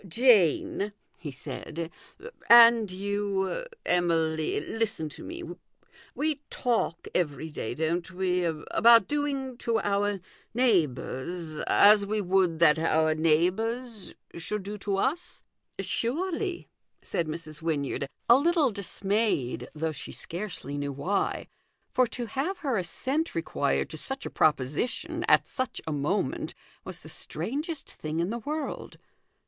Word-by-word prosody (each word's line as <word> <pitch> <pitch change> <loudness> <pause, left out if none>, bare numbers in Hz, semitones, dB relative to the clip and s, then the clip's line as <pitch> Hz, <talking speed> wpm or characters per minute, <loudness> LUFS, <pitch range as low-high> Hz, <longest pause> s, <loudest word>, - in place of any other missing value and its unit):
" - - -22
Jane," 205 - +3 0.2
he 160 - -7
said, 160 +4 -6 0.3
" 485 - -13
and 235 -2 +8
you, 200 - -2 0.2
Emily, 165 -3 +1
listen 220 -9 -2
to - - -9
me. 345 +1 -7 0.7
We 300 -1 -1
talk 230 -8 -1
every 160 -2 -1
day, 120 -5 -4
don't 165 +4 -1
we, 180 -1 0
about 190 +7 +4
doing 275 -3 -2
to 230 -1 +1
our 205 0 0 0.4
neighbours 165 - 0
as 205 0 +6
we 215 +1 0
would 185 -3 +2
that 160 -1 +5
our 160 -1 +3
neigh 160 +2 +3
bours 225 0 -4 0.2
should 190 +5 -3
do 205 +2 -5
to 195 0 -1
us? 285 - -2
" - - -54
" - - -40
Surely," 350 - -1 0.4
said 170 - -1
Mrs. 155 -1 -6
Wynyard, 145 -3 -1 0.2
a 240 - +8
little 315 -3 +3
dis 200 -1 -5
mayed, 195 - 0
though 160 +1 -1
she 145 - -8
scarcely 165 -6 -5
knew 140 -1 -3
why: 180 +9 -1 0.5
for 255 -1 +3
to 240 +1 -4
have 280 - -2
her 265 -4 +1
assent 260 - -1
required - - 0
to - - -6
such 270 0 -4
a - - -5
proposition, 150 - 0
at - - +5
such 260 -2 -3
a 160 - -3
moment, 145 +7 -1 0.3
was - - -7
the - - -12
strangest 300 +4 -3
thing 155 +1 -5
in 175 +4 0
the 235 - -3
world. 300 +6 -4
195 Hz, 140 wpm, -28 LUFS, 160-240 Hz, 0.7 s, and